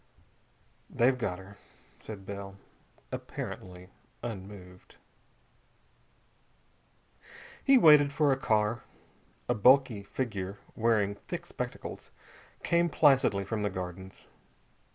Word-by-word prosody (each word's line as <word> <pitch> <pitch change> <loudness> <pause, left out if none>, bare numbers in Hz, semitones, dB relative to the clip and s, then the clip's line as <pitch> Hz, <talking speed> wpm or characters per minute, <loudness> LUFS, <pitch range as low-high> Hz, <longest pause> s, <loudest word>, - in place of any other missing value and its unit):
"They've 125 +2 +3
got 105 -8 -3
her," 95 +2 -13 0.4
said 100 -3 -9
Bell, 100 -1 -7 0.6
apparently 90 0 -7 0.3
unmoved. 95 -4 -9 2.7
He 275 -1 +6
waited 150 - +7
for 145 0 +2
a - - +4
car. 110 -4 +1 0.7
A 120 - +2
bulky 125 -1 +4
figure 100 -3 -4 0.2
wearing 110 -3 +2
thick - - -5
spectacles - - -6 0.5
came 170 0 +2
placidly 135 -10 +4
from 110 +1 -3
the 105 - 0
Gardens. 95 +1 -7
105 Hz, 90 wpm, -30 LUFS, 95-130 Hz, 2.7 s, waited